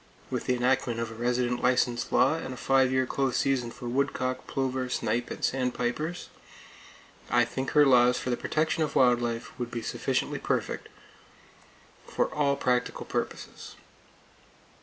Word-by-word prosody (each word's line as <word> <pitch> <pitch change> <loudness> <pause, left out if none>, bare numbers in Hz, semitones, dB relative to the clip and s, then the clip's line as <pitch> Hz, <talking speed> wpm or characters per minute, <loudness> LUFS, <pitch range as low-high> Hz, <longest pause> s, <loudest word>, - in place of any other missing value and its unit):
With - - -2
the 125 - +2
enactment 125 -1 +1
of 115 -1 -3
a - - -7
resident 125 +1 0
license 125 -1 +1
law 135 +4 +4
and 145 -5 -5
a - - -13
five 130 0 +3
year 130 0 +2
close 135 0 0
season 130 -3 +1
for 120 - -8
woodcock, 130 0 -1
plover, 130 -1 -2
snipe 120 0 -1
and - - -2
sandpipers, 130 +6 -2 1.0
I 120 - +4
think 130 +3 -4
her 145 - +8
laws 125 -2 +5
for 125 - -3
the - - +2
protection 155 +5 -1
of 150 -2 -1
wild 125 -2 +4
life 115 -1 -3
would 120 -1 -3
be 120 -1 -5
sufficiently - - -1
perfect - - -2 1.2
for - - -1
all 140 -2 +2
practical 125 -2 -1
purposes. - - -5
125 Hz, 155 wpm, -28 LUFS, 120-135 Hz, 1.2 s, her